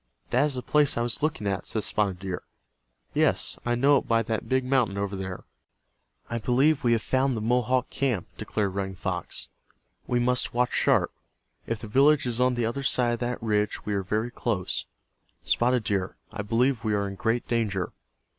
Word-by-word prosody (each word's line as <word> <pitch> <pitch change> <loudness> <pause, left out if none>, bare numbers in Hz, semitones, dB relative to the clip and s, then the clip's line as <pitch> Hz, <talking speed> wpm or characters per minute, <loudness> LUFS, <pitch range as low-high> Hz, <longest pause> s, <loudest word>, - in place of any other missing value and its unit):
"That 125 +4 +4
is 145 -3 -1
the 125 - -4
place 150 -4 +3
I 120 - +1
was 120 +3 +1
looking 150 -8 -1
at," 100 -1 -2
said 110 - -1
Spotted 100 -4 0
Deer. 90 -1 -4 0.7
"Yes, - - +1
I 120 - +2
know 140 +4 +5
it - - -12
by 115 0 +3
that 110 -1 -3
big 130 0 +2
mountain 125 -6 +2
over 100 0 -2
there." 95 -1 -5 0.8
"I 120 - -3
believe 130 +6 +2
we 120 -1 +4
have 115 - +1
found 130 -1 +1
the - - -1
Mohawk 125 +2 +1
camp," 125 -9 0
declared 100 -3 -2
Running 95 -1 -3
Fox. 90 0 -4 0.6
"We 125 - +1
must 125 0 +1
watch 125 0 +1
sharp. - - +2 0.5
If 115 - -1
the 110 - -6
village 140 +6 +4
is 120 0 -1
on 125 0 +3
the 120 -1 0
other 120 +5 -2
side 125 -3 +2
of 120 - -2
that 120 -1 -3
ridge 105 -1 0
we 105 - -1
are 100 - +1
very 110 +5 -1
close. 105 -7 -2 0.6
Spotted 125 0 +2
Deer, 100 -3 -1 0.2
I - - -4
believe 115 +3 +1
we 110 -2 +1
are 100 0 0
in 100 - -5
great 115 +4 -1
danger." 105 -6 -1
115 Hz, 195 wpm, -27 LUFS, 105-125 Hz, 0.8 s, know